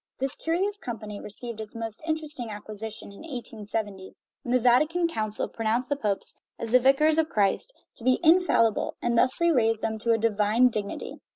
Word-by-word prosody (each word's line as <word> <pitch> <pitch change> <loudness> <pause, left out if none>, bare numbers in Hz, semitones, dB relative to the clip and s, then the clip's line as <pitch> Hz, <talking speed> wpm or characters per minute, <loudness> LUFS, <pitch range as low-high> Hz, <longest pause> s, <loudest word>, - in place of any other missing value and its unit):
This 270 0 -2
curious 385 +5 -1
com 240 - -5
pany 210 -1 -8
received 220 +1 -7
its 215 0 -9
most 225 -1 -6
interesting 305 -6 -3
acquisition 215 0 -8
in 200 - -13
1870, 215 -8 -6 0.3
when 240 - -5
the - - +5
Vatican 305 +9 +3
Council 215 -9 -1
pronounced 230 +3 -1
the 285 - +1
popes, 210 -7 -2 0.2
as 230 - -4
the 255 - +7
vicars 300 +5 +4
of 320 0 +1
Christ, 205 - +1 0.3
to - - -10
be 255 +1 +3
infallible, 320 - +3
and 240 0 0
thus 255 +2 +2
raised 235 -10 +2
them 220 0 -1
to 230 +1 +1
a 225 - +4
divine 220 +2 +3
dignity. 210 -3 -5
230 Hz, 180 wpm, -27 LUFS, 215-285 Hz, 0.3 s, the